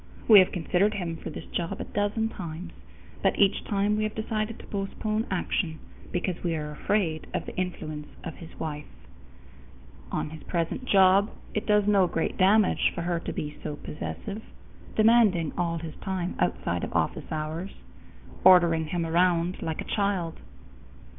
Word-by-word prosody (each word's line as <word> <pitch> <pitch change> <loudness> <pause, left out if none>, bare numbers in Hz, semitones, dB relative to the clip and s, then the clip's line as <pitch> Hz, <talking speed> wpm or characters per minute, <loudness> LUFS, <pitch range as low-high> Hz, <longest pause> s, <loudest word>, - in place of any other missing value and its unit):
We 215 -3 +10
have 185 - +4
considered 190 +4 +1
him 170 -4 -3
for - - -7
this - - -7
job 170 -1 -3
a - - -2
dozen 210 +2 -1
times, 170 -3 -7 0.5
but - - +2
each 200 0 +3
time 205 +1 +1
we 215 - 0
have 215 0 -2
decided 220 0 -2
to - - -12
postpone 215 +2 -2
action, 175 -3 -1 0.3
because 180 0 -2
we 170 -2 0
are 150 -1 -4
afraid 160 0 -1
of - - -2
the - - -8
influence 155 -5 -4 0.2
of 165 - -5
his 165 - -12
wife. 150 -2 -4 1.2
On 150 - -2
his 160 - -9
present 170 +8 -2
job, 195 -1 +5 0.2
it 210 - -2
does 210 -1 +4
no 200 -3 +4
great 165 -1 -1
damage 200 +2 +4
for 170 - -3
her 170 -1 0
to - - -5
be 150 0 -5
so 150 -1 -4
possessive, 200 +8 -6 0.5
demanding 215 -8 +4
all 170 -1 0
his 160 -1 -6
time 185 -2 -3
outside - - 0
of - - -4
office - - -1
hours, 160 +4 -3 0.7
ordering 170 -4 +6
him 170 +1 -1
around 175 +1 +2
like 160 -1 -3
a - - -3
child. 195 -5 0
180 Hz, 165 wpm, -27 LUFS, 165-205 Hz, 1.2 s, We